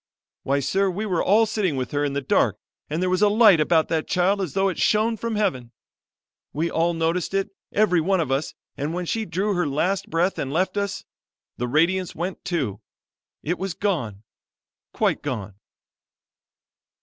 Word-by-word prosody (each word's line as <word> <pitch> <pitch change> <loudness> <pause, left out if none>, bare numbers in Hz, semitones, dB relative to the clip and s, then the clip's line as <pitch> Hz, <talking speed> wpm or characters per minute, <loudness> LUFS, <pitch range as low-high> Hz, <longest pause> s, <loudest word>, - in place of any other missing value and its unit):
Why, 140 +1 0
sir, 195 +8 +1
we 200 +4 -3
were 180 -5 0
all 220 +4 +4
sitting 205 -7 -1
with 130 -1 -3
her 145 0 0
in 145 -1 -1
the 140 - -1
dark, 130 - +2 0.3
and 160 +4 -1
there 185 - +1
was 185 +1 +1
a 210 - +5
light 210 -5 +6
about 160 +1 +3
that 160 -1 -1
child 190 +2 +2
as 180 -6 -3
though 195 0 +3
it 185 - -3
shone 220 +2 +2
from 230 0 -3
Heaven. 150 - -1 0.8
We 165 +4 -1
all 170 +1 +1
noticed 165 +3 -1
it, 195 +1 0 0.2
every 200 -5 +3
one 190 +3 +1
of 155 -5 -1
us, 135 +3 -1 0.2
and 150 +4 -3
when 180 0 -3
she 220 +5 -2
drew 195 +4 -1
her 175 -4 0
last 180 +7 -1
breath 175 +4 0
and 135 - -3
left 185 +5 0
us, 200 -1 -3 0.5
the 125 - -2
radiance 170 +7 +1
went, 180 +3 -4
too; 130 - -2 0.6
it 175 +4 -2
was 190 -2 -3
gone, 125 - -2 0.7
quite - - 0
gone." 110 -8 -4
175 Hz, 185 wpm, -23 LUFS, 150-195 Hz, 0.8 s, light